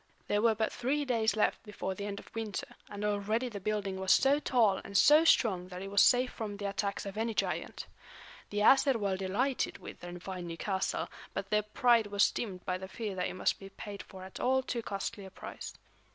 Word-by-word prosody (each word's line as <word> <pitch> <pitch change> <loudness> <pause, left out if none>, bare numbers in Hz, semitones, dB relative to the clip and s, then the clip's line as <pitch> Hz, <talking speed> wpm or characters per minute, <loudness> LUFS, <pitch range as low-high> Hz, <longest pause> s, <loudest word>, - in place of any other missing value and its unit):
There 205 - +1
were 225 -1 +4
but 220 0 -1
three 285 +4 0
days 225 -5 +1
left 215 - +1
before 205 -3 -4
the 200 +2 -5
end 200 -1 -4
of - - -15
winter, 220 -3 -3 0.2
and 205 +1 -4
already 210 +4 0
the 205 -3 -6
building 200 -1 -2
was 190 0 +1
so 275 +2 +5
tall 230 -9 +3
and 200 - -1
so 300 +8 +7
strong 195 - +3
that 180 0 -7
it 195 - -7
was 200 - +5
safe 250 0 +5
from 210 -3 -5
the 205 0 -3
attacks 200 +1 -2
of 200 +1 -6
any 225 0 -1
giant. - - -2 0.6
The 205 0 -1
Æsir 270 +4 +6
were 200 -4 0
delighted 205 +8 -1
with - - -10
their 175 0 -8
fine 180 -1 -6
new 165 0 -6
castle; 190 0 -1 0.3
but 195 0 -4
their 210 0 +4
pride 230 +1 +3
was 200 0 +3
dimmed 190 -6 -5
by 180 0 -1
the 190 - -7
fear 210 +1 -4
that 180 -1 -1
it - - -6
must 185 - 0
be 195 - -10
paid 200 0 -8
for 190 -1 -11
at 190 - -9
all 260 +1 +2
too 240 -2 -2
costly 200 0 -4
a 190 - -9
price. - - -8
205 Hz, 225 wpm, -32 LUFS, 195-230 Hz, 0.6 s, so